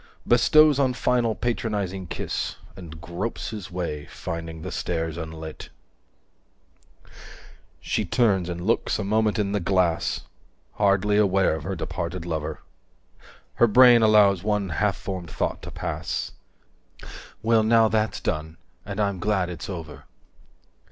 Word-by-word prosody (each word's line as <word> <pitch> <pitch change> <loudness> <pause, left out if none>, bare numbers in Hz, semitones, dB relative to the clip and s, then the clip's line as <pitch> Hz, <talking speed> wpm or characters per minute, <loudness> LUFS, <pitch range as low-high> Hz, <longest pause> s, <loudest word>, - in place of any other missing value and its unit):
Bestows 150 +4 +5
one 130 -2 +2
final 120 -4 +1
patronizing 105 -6 -2
kiss, - - -3 0.2
And 85 -4 -10
gropes 85 +9 -4
his 105 -3 -7
way, 85 -5 -4
finding 80 -1 -6
the 95 - -5
stairs 80 -2 -2
unlit… 80 -1 -7 2.1
She - - -1
turns 100 -7 +1
and 85 0 -5
looks 115 - +1
a 105 - -3
moment 110 +1 +1
in 100 -2 0
the 105 - 0
glass, 90 -2 +1 0.5
Hardly 100 0 +2
aware 95 -4 +3
of 80 - -4
her 95 - -3
departed 85 0 -4
lover; 80 -3 -4 1.0
250 - - -23
Her 120 - +6
brain 120 +1 +7
allows 105 -4 +5
one 105 -2 0
half 100 +4 0
formed 90 -4 -6
thought - - -2
to - - -8
pass: - - -4 1.1
"Well 115 0 +4
now 115 0 +4
that's 110 0 0
done: 80 +1 -3 0.3
and 100 0 -6
I'm 100 -3 0
glad 95 -2 0
it's 85 - -7
over." 75 -7 -7
95 Hz, 135 wpm, -25 LUFS, 85-110 Hz, 2.1 s, brain